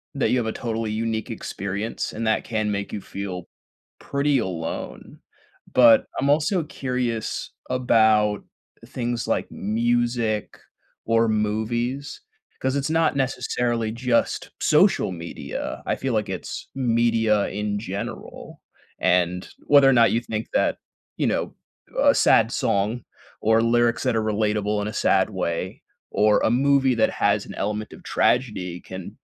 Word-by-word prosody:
that - - +1
you - - +3
have 115 - -2
a - - 0
totally 115 -2 -3
unique 110 0 -2
experience 100 +3 -4
and 115 +1 -3
that 110 0 +1
can 110 -2 -1
make 100 0 -3
you - - -4
feel 95 -3 -6 0.5
pretty 140 -1 +1
alone. 85 -5 -5 0.5
But 120 -3 +7
I'm 140 +1 +1
also 160 +4 +2
curious 125 -6 -3 0.2
about 110 -5 +3 0.4
things 120 -3 -3
like - - -1
music 115 0 -1 0.5
or 115 0 +3
movies, 115 - -2 0.4
'cause 130 +1 -1
it's 140 +1 -1
not 160 -2 +2
necessarily 120 -4 -1
just 120 +1 0
social - - +3
media, 85 -1 -6
I - - 0
feel 130 -2 -2
like 105 -3 0
it's 95 - -6
media 115 -4 +2
in 105 +1 -2
general. 100 -2 -7 0.4
And, 90 0 +1 0.2
whether 140 -2 +7
or 135 - +5
not 115 -2 +5
you 115 - +1
think 110 -2 -4
that, - - +2 0.4
you - - +1
know, - - -1 0.4
uh, - - +5
a - - +5
sad - - +4
song 105 +4 0 0.4
or 110 +1 +4
lyrics 120 0 +2
that 125 -3 +1
are 110 - +1
relatable 105 -1 0
in 105 - -3
a 110 - -5
sad 95 +2 +2
way, 90 -1 -3 0.3
or 105 0 +3
a - - +2
movie 135 +1 +3
that 110 - +2
has - - +1
an - - -9
element 105 +1 -3
of - - -13
tragedy 95 -8 0
can 95 -1 -9
115 Hz, 145 wpm, -23 LUFS, 105-125 Hz, 0.5 s, But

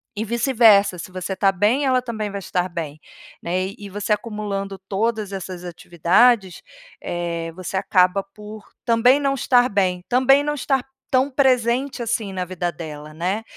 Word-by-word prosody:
e 220 - -3
vice-versa. 225 -5 +4
Se 175 - -8
você 185 +1 -4
tá 195 -1 +3
bem, 220 +9 +2
ela 255 -1 +2
também 220 -4 -4
vai 200 - -4
estar 180 -1 -2
bem, 160 -4 -6 0.4
né? 185 +2 -1
E 205 - -9
você 205 +2 -4
acumulando 205 -2 -3
todas 210 +2 -2
essas 185 -2 -6
atividades, 180 +4 +2 0.4
eh, 170 -1 -3
você 185 +1 -4
acaba 190 0 +3
por 210 +2 -12 0.2
também 245 +4 +4
não 275 -1 +1
estar 250 -1 +3
bem. 185 -3 0
Também 265 +3 +4
não 295 0 -1
estar 270 -2 0 0.3
tão 265 +2 +2
presente, 255 -1 +1
assim, 220 -3 -2
na 185 -1 -2
vida 175 -1 -3
dela, 155 -2 -9
né, 185 +7 -2
200 Hz, 160 wpm, -21 LUFS, 185-240 Hz, 0.4 s, vice-versa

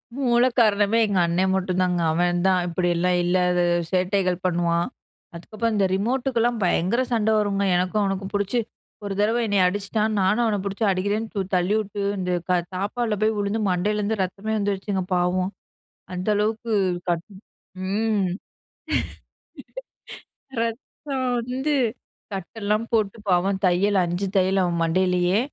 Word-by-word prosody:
மூலக்காரணமே 235 -5 +3
எங்க 200 -3 +1
அண்ணன் 185 +3 +1
மட்டும் 185 -1 -1
தாங்க. 180 -1 0
அவன் 175 +1 +1
தான் 185 -1 +3
இப்படியெல்லாம் 175 +1 +1
இல்லாத 180 0 +2 0.3
சேட்டைகள் 185 0 +1
பண்ணுவான். 170 -1 +1 0.5
அதுக்கப்புறம் 215 +6 -3
இந்த 200 -2 +3
ரிமோட்டுக்கெல்லாம் 240 +2 0
பயங்கர 185 +6 +1
சண்டை 220 -1 +2
வரும்ங்க, 200 -1 0
எனக்கும் 185 +4 +1
அவனுக்கும். 195 0 -2
புடிச்சு 205 +4 0 0.5
ஒரு 200 - -3
தடவை 220 +3 +2
என்னைய 200 -3 +3
அடிச்சிட்டான். 205 +3 -1
நானும் 200 +5 +2
அவனை 215 -2 +1
புடிச்சு 200 +3 -3
அடிக்கிறேன்னு 205 +4 -1
ச் 195 -2 -3
தள்ளிவிட்டு, 200 +2 0 0.2
இந்த 180 -1 -2 0.2
க - - +3 0.2
தாப்பாள்ல 210 +4 -1
போய் 215 0 +2
விழுந்து, 205 +2 -1
மண்டையிலிருந்து 205 +3 0
ரத்தமே 200 +4 -4
வந்துருச்சுங்க, 200 -1 -1
பாவம். 180 +1 0 0.6
அந்த 180 +3 -4
அளவுக்கு 220 +2 -1 0.4
கட் 170 -1 -1 0.6
ம். 210 -1 +1 2.3
ரத்தம் 260 +3 -4 0.2
வந்து 265 +4 0 0.6
கட்டெல்லாம் 210 +3 -2
போட்டு, 215 -2 +1
பாவம் 190 +2 +2
தையல் 190 +2 +3
5 175 +3 -2
தையல் 190 +1 +2
அவன் 170 -1 -1
மண்டையிலயே 180 +2 +2
195 Hz, 125 wpm, -23 LUFS, 180-215 Hz, 2.3 s, மூலக்காரணமே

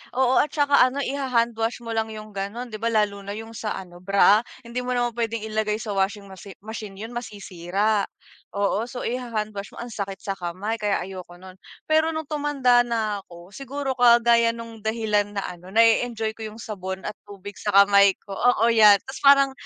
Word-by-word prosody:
oo, 260 0 +3
at - - +3
saka 285 -1 +3
ano, 280 +2 -3
iha-handwash 240 -4 -1
mo 230 - -6
lang 225 -1 -1
yung 215 -1 -9
gano'n, 205 +5 -5
'di 215 - -6
ba, 230 - -1
lalo 210 -3 +1
na 200 +1 -7
yung 225 +1 -8
sa 220 -1 -4
ano, 175 -2 -10
bra? 200 +2 +5 0.2
Hindi 235 +1 -5
mo 250 0 -2
naman 240 0 0
puwedeng 230 -1 -3
ilagay 215 -1 -1
sa 215 0 -5
washing 200 +1 -1
wachi 190 +1 -11
machine 215 -2 -7
'yon, 220 +4 -8
masisira, 205 -2 -2 0.5
oo. 200 +3 0
So, 245 0 -7
iha-hand 230 -3 -3
wash 200 -1 -8
mo, - - -15
ang 240 - -9
sakit 200 -2 -4
sa 195 -1 -4
kamay, 185 +6 -4
kaya 205 -3 0
ayoko 185 -1 -9
nun. 185 +1 -14 0.2
Pero 315 +1 +2
nung 315 - -2
tumanda 285 -5 +2
na 220 -3 -1
ako, 170 +2 -14
siguro 275 +3 -4
kagaya 235 -2 +4
nung 230 -1 -9
dahilan 210 -2 -1
na 200 - -2
ano, 180 0 -8
nae-enjoy 225 +1 +2
ko 220 0 -7
yung 215 +2 -11
sabon 190 -2 -6
at 210 - -4
tubig 205 0 -10
sa 205 -2 -2
kamay 200 -1 +5
ko, 200 - -12
oo, 235 -1 +3
yan, 215 -3 +8
ta's 265 - -8
parang, 275 -1 +6
220 Hz, 195 wpm, -24 LUFS, 200-240 Hz, 0.5 s, yan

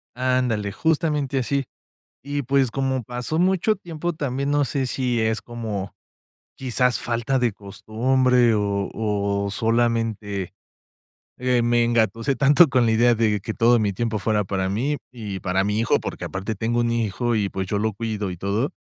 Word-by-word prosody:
Ándale, 125 -5 0
justamente 150 -1 0
así. 140 +2 0 0.6
Y, 145 +1 -2
pues, 135 -1 +2
como 130 -1 -1
pasó 125 +6 -3
mucho 190 +4 +2
tiempo, 175 -2 -4
también, 140 -2 -2
no 145 0 +2
sé 135 +1 -1
si 125 -2 0
es 110 0 0
como, 110 -5 -5 0.6
quizás, 125 -3 +1
falta 120 +4 -1
de 120 -2 +1
costumbre, 120 +4 +1
o 100 -1 -1
o 100 -2 -1
solamente, 115 -4 -1 0.9
eh, 125 -1 +2
me 120 0 +3
engatusé 115 +3 +1
tanto 145 +4 +6
con 125 -3 +2
la 110 - +3
idea 120 +2 +4
de 110 -2 +1
que 110 +3 -4
todo 120 +2 +4
mi 105 -2 0
tiempo 110 +2 -2
fuera 105 0 0
para 95 0 -2
mí 130 +9 0 0.2
y 105 -6 -6
para 95 +1 0
mi 105 +1 0
hijo, 115 - +2
porque, - - -5
aparte, 95 +4 -4
tengo 115 +3 0
un 120 0 +1
hijo 115 +1 0
y, 100 -2 0
pues, 95 0 -3
yo 100 +2 -1
lo 110 +1 0
cuido 105 -2 -3
y 90 - -7
todo. 100 +9 -1
115 Hz, 170 wpm, -23 LUFS, 105-130 Hz, 0.9 s, tanto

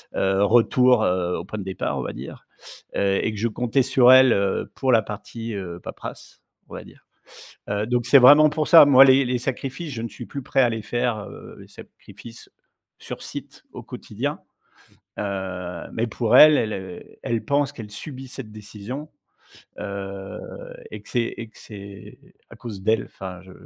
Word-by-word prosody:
Heu, 95 +1 +1
retour, 120 +2 +4
heu, 90 -1 0
au 85 - -6
point 110 +2 -7
de - - -5
départ, 95 -1 -3
on - - -1
va - - -5
dire - - -10 0.5
et 100 +1 0
et 110 - -1
que 105 - -7
je 115 - +1
comptais 125 +4 0
sur 125 0 +5
elle, 130 -1 +7
heu, 100 -1 -1
pour 130 -1 0
la 115 - +5
partie, 115 +2 -7
heu, 90 -3 -6
paperasse, - - -10 0.3
on - - -9
va - - -8
dire. - - -18 0.6
Heu, 100 +1 -1
donc 120 -1 0
c'est 130 - +7
vraiment 145 +4 +8
pour 150 0 -2
ça. 165 - +9
Moi, 135 -1 +8
les 135 0 +5
les 125 0 -1
sacrifices, 135 +4 -5
je 115 - -5
ne - - -3
suis 105 - -10
plus 140 - -6
prêt 135 - +1
à 125 - +4
les 115 -1 -4
faire, 120 +1 -1
heu, - - -12
les - - -14
sacrifices, 115 0 -14 0.5
sur - - -8
site - - -9
au - - -9
quotidien. - - -5 0.8
Heu, 95 -3 -5
mais 115 +1 -1
pour 115 +2 -1
elle, 155 +1 +9
elle, 110 -1 -1
heu, 95 -2 -8 0.2
elle 115 -1 -2
pense 145 0 0
qu'elle 110 -7 -10
subit 130 +3 -9
cette 125 -4 -9
décision, 110 +7 -8 0.7
heu 100 -1 -6 0.5
et - - -8
que - - -17
c'est 120 -2 -1
et 115 - -7
que 110 - -22
c'est 100 -2 -12 0.3
à - - -13
cause 105 -5 -8
d'elle. 110 0 +1
Enfin, 90 -2 -9
je 95 - -15
115 Hz, 190 wpm, -23 LUFS, 100-130 Hz, 0.8 s, ça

